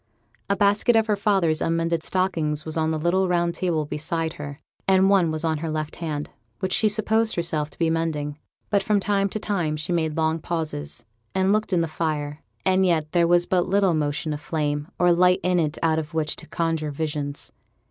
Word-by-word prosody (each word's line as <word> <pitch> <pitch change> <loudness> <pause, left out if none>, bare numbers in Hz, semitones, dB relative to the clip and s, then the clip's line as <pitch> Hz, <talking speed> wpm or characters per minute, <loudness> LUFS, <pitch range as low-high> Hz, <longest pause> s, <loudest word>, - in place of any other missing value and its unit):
A 200 - +3
basket 205 +4 +3
of 225 -1 +4
her 215 -2 +1
father's 195 -6 +1
unmended 165 0 0
stockings 160 -5 -1
was 160 - -4
on 160 -1 +1
the 160 - 0
little 175 +4 +1
round 175 -1 +1
table 170 -5 -1
beside 160 +2 -2
her, 145 0 -8 0.3
and 190 0 +5
one 185 -4 +4
was 155 0 -3
on 160 -2 0
her 165 +1 -3
left 155 0 -3
hand, 150 -3 -4 0.3
which 185 +5 -2
she 215 - +4
supposed 220 +1 +1
herself 160 -3 -1
to - - -16
be 165 - +1
mending; 155 -3 -2 0.3
but 200 -1 +3
from 205 +1 +2
time 200 0 +1
to 215 - -4
time 175 -8 -1
she 155 +3 -3
made 160 -2 0
long 160 0 +1
pauses, 155 -7 -3 0.3
and 190 +1 +3
looked 215 0 0
in 175 -2 +3
the 165 - 0
fire; 150 -2 -3 0.2
and 190 0 +3
yet 160 -4 +1
there 170 -1 +3
was 175 0 +4
but 180 -1 +1
little 195 -2 +3
motion 150 0 -1
of 150 - -6
flame 150 -2 -2
or 180 0 +4
light 180 +1 +4
in 180 0 +2
it 155 -2 -1
out 160 -1 +3
of 160 +1 -7
which 155 -2 0
to - - -7
conjure 165 -2 -1
visions. 145 -1 -4
165 Hz, 210 wpm, -24 LUFS, 155-185 Hz, 0.3 s, and